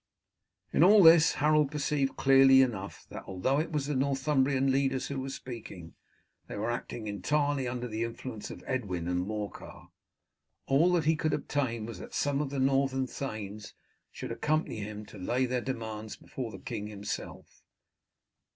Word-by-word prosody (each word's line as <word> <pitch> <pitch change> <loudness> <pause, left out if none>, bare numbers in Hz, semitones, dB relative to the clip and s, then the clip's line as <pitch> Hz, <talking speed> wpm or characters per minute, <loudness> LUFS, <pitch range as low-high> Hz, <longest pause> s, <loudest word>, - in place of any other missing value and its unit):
In - - +5
all 200 +2 +8
this 165 -1 +8
Harold 150 -1 +3
perceived 145 -2 -1
clearly 135 0 +7
enough 100 -6 -4
that, - - -7
although 95 +10 0
it 160 - -2
was 150 -3 -1
the 150 - -2
Northumbrian 135 0 +2
leaders 135 -1 0
who 140 -1 -3
were 135 - -4
speaking, 115 -11 -8 0.5
they - - -6
were 110 +3 -1
acting 120 -1 -5
entirely 140 +7 0
under 125 0 -3
the 110 0 -3
influence 115 -1 -6
of - - -9
Edwin 95 -10 -2
and 90 +1 -1
Morcar. 105 -1 -6 0.8
All 150 +7 +4
that 170 -4 +2
he 160 +1 +4
could 155 0 -1
obtain 120 -6 -1
was 115 - -7
that - - -9
some 145 0 +1
of 145 - -2
the 140 - -4
northern 135 0 +2
thanes 110 -6 -6 0.4
should - - -7
accompany 155 -4 -1
him 105 0 -6
to 105 - -12
lay 125 +8 0
their 125 0 -1
demands 110 -4 -5
before 125 -3 -6
the 95 - -8
king 105 +2 -5
himself. 105 -1 -7
130 Hz, 165 wpm, -30 LUFS, 110-140 Hz, 0.8 s, all